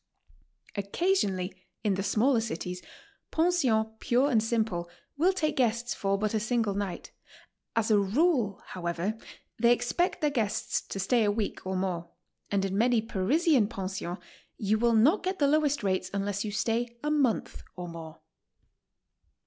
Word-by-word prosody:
Occaslionally, 200 Hz, -, 0 dB, 0.3 s
in 210 Hz, -3 st, +2 dB
the 190 Hz, -, -1 dB
smaller 230 Hz, +5 st, +2 dB
cities, 180 Hz, -4 st, -4 dB, 0.5 s
pensions 320 Hz, -10 st, +2 dB
pure 260 Hz, +4 st, +2 dB
and 225 Hz, -3 st, +4 dB
simple 215 Hz, -6 st, -1 dB, 0.3 s
will 340 Hz, +6 st, +3 dB
take 320 Hz, -5 st, -1 dB
guests 240 Hz, 0 st, +1 dB
for 195 Hz, 0 st, 0 dB
but 215 Hz, +1 st, -1 dB
a 220 Hz, -, +2 dB
single 230 Hz, -2 st, 0 dB
night; 200 Hz, -2 st, -4 dB, 0.6 s
as 225 Hz, -1 st, +1 dB
a 210 Hz, -, +6 dB
rule, 225 Hz, -, +1 dB
how 180 Hz, -2 st, -5 dB
ever, 175 Hz, +5 st, -1 dB, 0.4 s
they 235 Hz, +1 st, +5 dB
expect 245 Hz, +10 st, +1 dB
their 300 Hz, -1 st, +2 dB
guests 225 Hz, -7 st, -1 dB
to 195 Hz, -, -7 dB
stay 230 Hz, +5 st, +2 dB
a 205 Hz, -, +3 dB
week 210 Hz, 0 st, -3 dB
or 190 Hz, -, -1 dB
more, 180 Hz, -3 st, -2 dB, 0.4 s
and 195 Hz, -1 st, +1 dB
in 195 Hz, 0 st, -2 dB
many 240 Hz, 0 st, +4 dB
Parisian 230 Hz, -, +2 dB
pensions 190 Hz, -4 st, -4 dB, 0.4 s
you 215 Hz, 0 st, +1 dB
will 235 Hz, 0 st, +3 dB
not 290 Hz, -, +5 dB
get 375 Hz, +1 st, -2 dB
the 290 Hz, -, +3 dB
lowest 295 Hz, -2 st, +2 dB
rates 185 Hz, -1 st, 0 dB
unless 200 Hz, 0 st, -1 dB
you 215 Hz, -, -3 dB
stay 235 Hz, +3 st, -1 dB
a 300 Hz, -, 0 dB
month 275 Hz, -7 st, 0 dB
or 180 Hz, -1 st, -6 dB
more. 165 Hz, -2 st, -9 dB
220 Hz, 155 wpm, -29 LUFS, 195-255 Hz, 0.6 s, a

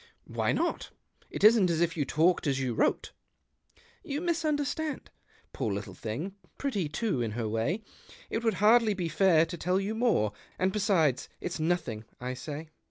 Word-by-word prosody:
"Why -, -, 0 dB
not? -, -, -1 dB, 0.4 s
It -, -, -5 dB
isn't 215 Hz, -4 st, +7 dB
as 165 Hz, -2 st, +1 dB
if 170 Hz, -1 st, +1 dB
you 150 Hz, -4 st, 0 dB
talked 160 Hz, +4 st, +2 dB
as 135 Hz, -1 st, +1 dB
you 130 Hz, -3 st, -1 dB
wrote." -, -, +1 dB, 0.5 s
" 470 Hz, 0 st, -31 dB
You 290 Hz, -, 0 dB
misunderstand. 310 Hz, -3 st, -1 dB, 0.4 s
Poor 110 Hz, -, -2 dB
little 100 Hz, 0 st, -4 dB
thing 115 Hz, -, -5 dB
— -, -, -36 dB
pretty 205 Hz, -, -1 dB
too, 170 Hz, -, -1 dB
in 110 Hz, -3 st, -2 dB
her 115 Hz, -1 st, -2 dB
way! 115 Hz, -, -1 dB, 0.4 s
It 225 Hz, -, -3 dB
would 225 Hz, -1 st, +2 dB
hardly 220 Hz, 0 st, +5 dB
be 175 Hz, -3 st, -2 dB
fair 165 Hz, -1 st, +4 dB
to 175 Hz, +1 st, -7 dB
tell 180 Hz, +3 st, +1 dB
you 200 Hz, +2 st, -2 dB
more; 220 Hz, -, +2 dB, 0.2 s
and 185 Hz, +1 st, +1 dB
l^esides, 185 Hz, -, +2 dB
it's 175 Hz, -, -4 dB
nothing, 155 Hz, -10 st, -1 dB
I 125 Hz, +1 st, -3 dB
say." 150 Hz, +4 st, -7 dB
175 Hz, 175 wpm, -29 LUFS, 135-220 Hz, 0.5 s, isn't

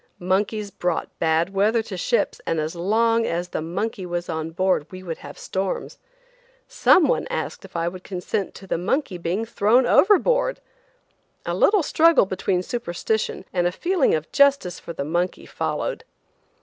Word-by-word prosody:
Monkeys 200 Hz, +3 st, -1 dB
brought 175 Hz, -2 st, -2 dB
bad 165 Hz, +3 st, +1 dB
weather 215 Hz, +4 st, +2 dB
to 205 Hz, -, -7 dB
ships, 210 Hz, +4 st, 0 dB
and 165 Hz, -, 0 dB
as 155 Hz, +3 st, -3 dB
long 225 Hz, +6 st, +2 dB
as 175 Hz, +1 st, -2 dB
the -, -, -3 dB
monkey 190 Hz, +6 st, -3 dB
was 175 Hz, -1 st, -4 dB
on 160 Hz, 0 st, -3 dB
board 180 Hz, -2 st, 0 dB
we 185 Hz, 0 st, -9 dB
would 165 Hz, -3 st, -5 dB
have 145 Hz, -, -10 dB
storms. 190 Hz, 0 st, -4 dB, 0.7 s
Some 375 Hz, -9 st, +4 dB
one -, -, 0 dB
asked -, -, -4 dB
if -, -, -16 dB
I 170 Hz, 0 st, 0 dB
would 180 Hz, +1 st, -6 dB
consent 195 Hz, +2 st, -3 dB
to 195 Hz, -, -11 dB
the 180 Hz, -, -2 dB
monkey 195 Hz, -, -1 dB
being 180 Hz, +6 st, -1 dB
thrown 230 Hz, +3 st, +3 dB
overboard. 485 Hz, -, +3 dB, 0.9 s
A -, -, -2 dB
little 405 Hz, -4 st, +4 dB
struggle 330 Hz, -4 st, +4 dB
between 185 Hz, -1 st, -1 dB
superstition 220 Hz, -1 st, -2 dB
and 175 Hz, -1 st, +2 dB
a -, -, 0 dB
feeling 345 Hz, -, +1 dB
of 155 Hz, 0 st, -5 dB
justice 280 Hz, -10 st, +3 dB
for -, -, -8 dB
the 140 Hz, -4 st, -4 dB
monkey 175 Hz, +4 st, -1 dB
followed. -, -, -3 dB
190 Hz, 165 wpm, -23 LUFS, 175-230 Hz, 0.9 s, Some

